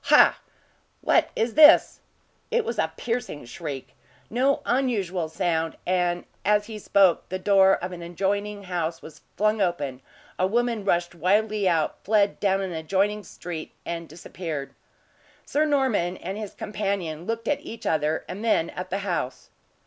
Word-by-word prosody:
Ha! - - +6 0.6
what - - +3
is 225 0 0
this?" 310 +1 +7 0.5
It 475 -2 +1
was - - -3
a - - +1
piercing 230 - -3
shriek 145 0 -6 0.4
no 265 +4 +2
unusual 200 -10 0
sound; 160 0 -1
and 175 -1 0 0.2
as 210 +1 +3
he 215 -1 -7
spoke, 195 -3 +3
the 185 - -2
door 195 0 +5
of 180 +1 -5
an 175 -1 -7
adjoining 200 +4 -2
house 170 -3 -3
was 160 - -12 0.2
flung 215 +1 +2
open, 145 -8 -1 0.4
a 185 - +3
woman 235 0 0
rushed 175 -3 +1
wildly 200 +4 +2
out, 160 -3 0
fled 205 -1 +2
down 195 -1 +2
an 190 -2 -3
adjoining 195 +6 0
street, 170 -5 -7
and 170 -1 -5
disappeared. 160 -2 -6 0.7
Sir 300 +2 +1
Norman 260 - +1
and 190 +3 -5
his 210 -2 -6
companion 195 -6 -3
looked 230 0 -3
at 290 -1 +1
each 230 -5 -9
other, 155 0 0
and 195 +4 -6
then 215 -7 +2
at 180 - -6
the 195 - -1
house. 170 -9 -3
190 Hz, 155 wpm, -25 LUFS, 170-215 Hz, 0.7 s, this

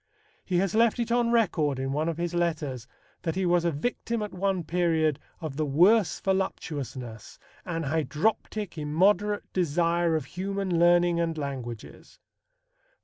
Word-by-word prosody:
He 180 - -1
has 190 0 +1
left 230 +1 +3
it 235 -1 -2
on 240 0 +2
record 170 - +2
in 135 +1 -2
one 155 +4 0
of 165 - -3
his 175 0 -2
letters 155 -8 -2 0.3
that 165 -1 -2
he 190 0 0
was 175 -1 +3
a - - +3
victim 230 +7 -2
at 210 - -6
one 190 -1 0
period 160 -3 +1 0.2
of 155 -5 -6
"the 155 - 0
worst 180 +8 +4
voluptuousness, 135 - -3 0.3
an 165 -1 -3
hydroptic, 160 +6 -1
immoderate 195 +7 +2
desire 170 0 +1
of 155 -4 -1
human 190 +1 -2
learning 175 0 +4
and 165 -1 -1
languages." 130 -6 -7
170 Hz, 145 wpm, -27 LUFS, 150-190 Hz, 0.3 s, worst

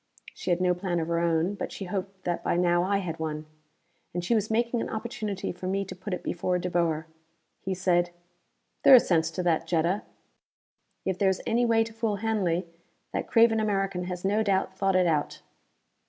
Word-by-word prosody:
She - - -6
had 175 -1 +2
no 180 -1 +3
plan 180 -1 -2
of 160 0 -3
her 170 0 +1
own, 170 +2 +1
but 205 - -5
she 195 - -6
hoped 190 0 -5
that 175 -1 -2
by - - +1
now 175 -1 +3
I 195 +3 +1
had 170 -4 -4
one! 155 -1 -3 0.7
And 175 0 -2
she 235 - +2
was 215 -2 +1
making 235 +1 +1
an - - -3
opportunity 220 -3 -4
for 180 +1 -7
me 195 +1 0
to 185 - -8
put 190 +3 -7
it 180 - -3
before 180 +1 -1
De 180 0 -3
Boer. 165 -2 +1 0.5
He 190 0 -3
said, 175 -1 +2 0.7
"There 270 - +9
is 245 - +5
sense 165 -2 +3
to 175 +3 -4
that, 165 -2 +1
Jetta. 170 +4 +1 1.0
If 190 -1 -1
there 195 - +4
is 190 - -2
any 235 +1 +2
way 225 -1 +4
to 225 0 -9
fool 225 -2 -1
Hanley, 195 -5 0 0.5
that - - -2
craven 225 -1 +5
American 195 -4 0
has 180 0 -5
no 205 +3 +2
doubt 195 -2 +1
thought 195 0 +1
it 185 -1 +4
out." 155 -4 -1
185 Hz, 205 wpm, -27 LUFS, 175-205 Hz, 1.0 s, There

